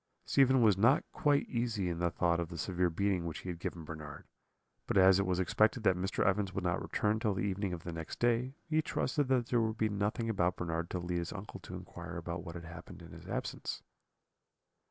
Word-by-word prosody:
Stephen 130 Hz, -2 st, +4 dB
was 105 Hz, -4 st, +5 dB
not 130 Hz, +8 st, +5 dB
quite 145 Hz, -5 st, +2 dB
easy 115 Hz, -6 st, -1 dB
in 85 Hz, -1 st, -2 dB
the 85 Hz, 0 st, +2 dB
thought 85 Hz, 0 st, +1 dB
of 85 Hz, -1 st, -2 dB
the 85 Hz, -, -7 dB
severe 90 Hz, +1 st, 0 dB
beating 90 Hz, 0 st, 0 dB
which 80 Hz, -, -5 dB
he 90 Hz, -, -6 dB
had 85 Hz, -2 st, -5 dB
given 85 Hz, -1 st, -4 dB
Bernard; 75 Hz, -1 st, -8 dB, 0.6 s
but -, -, +1 dB
as 95 Hz, 0 st, +7 dB
it 100 Hz, -, +1 dB
was 90 Hz, -1 st, +1 dB
expected 110 Hz, +5 st, +2 dB
that 95 Hz, -3 st, +4 dB
Mr. 95 Hz, +3 st, -1 dB
Evans 95 Hz, -1 st, +1 dB
would 95 Hz, -, -2 dB
not 90 Hz, 0 st, 0 dB
return 105 Hz, +1 st, 0 dB
till 105 Hz, -3 st, 0 dB
the -, -, -1 dB
evening 100 Hz, -1 st, -1 dB
of 85 Hz, -2 st, -5 dB
the 85 Hz, -, -5 dB
next 80 Hz, -1 st, -6 dB
day, 120 Hz, +3 st, +1 dB
he 155 Hz, -1 st, +2 dB
trusted 145 Hz, -2 st, 0 dB
that 125 Hz, -3 st, +1 dB
there 120 Hz, -2 st, +3 dB
would 110 Hz, 0 st, -1 dB
be 110 Hz, -1 st, +1 dB
nothing 105 Hz, +3 st, -1 dB
about 90 Hz, -5 st, +1 dB
Bernard 85 Hz, -1 st, -3 dB
to -, -, -2 dB
lead 90 Hz, 0 st, -2 dB
his 85 Hz, 0 st, -4 dB
uncle 100 Hz, +1 st, -7 dB
to -, -, -9 dB
inquire 85 Hz, 0 st, -7 dB
about 85 Hz, 0 st, -4 dB
what 85 Hz, -, -8 dB
had 85 Hz, -1 st, -7 dB
happened 85 Hz, +1 st, -10 dB
in -, -, -12 dB
his -, -, -11 dB
absence. -, -, -4 dB
95 Hz, 230 wpm, -33 LUFS, 85-110 Hz, 0.6 s, as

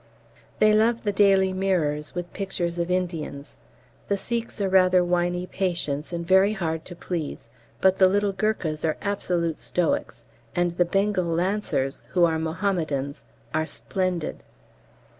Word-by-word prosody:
They 215 Hz, 0 st, +5 dB
love 225 Hz, +2 st, +3 dB
the 205 Hz, -, +1 dB
'Daily 195 Hz, -1 st, +4 dB
Mirrors' 165 Hz, -6 st, 0 dB
with 175 Hz, 0 st, -5 dB
pictures 175 Hz, -3 st, -2 dB
of 170 Hz, +1 st, -1 dB
Indians. 170 Hz, -6 st, -3 dB, 0.5 s
The 200 Hz, -, +1 dB
Sikhs 230 Hz, +3 st, -3 dB
are 200 Hz, -, +1 dB
rather 185 Hz, -1 st, +5 dB
whiney 175 Hz, 0 st, 0 dB
patients 170 Hz, -6 st, -2 dB
and 170 Hz, -1 st, -3 dB
very 190 Hz, +3 st, +5 dB
hard 160 Hz, -5 st, -3 dB
to 175 Hz, -, -9 dB
please, 165 Hz, -9 st, -5 dB, 0.3 s
but 190 Hz, 0 st, +4 dB
the 190 Hz, -, +7 dB
little 205 Hz, +1 st, +2 dB
Gurkhas 190 Hz, -6 st, -1 dB
are 155 Hz, -1 st, 0 dB
absolute 175 Hz, -5 st, -1 dB
stoics, 175 Hz, -2 st, -1 dB, 0.3 s
and 175 Hz, -1 st, +1 dB
the 175 Hz, -, +3 dB
Bengal 195 Hz, +1 st, +1 dB
Lancers, 170 Hz, -5 st, -1 dB
who 175 Hz, -2 st, +5 dB
are 160 Hz, -1 st, +1 dB
Mohammedans, 160 Hz, -, -2 dB, 0.3 s
are 155 Hz, 0 st, 0 dB
splendid. 185 Hz, -4 st, -2 dB
180 Hz, 140 wpm, -25 LUFS, 165-195 Hz, 0.5 s, the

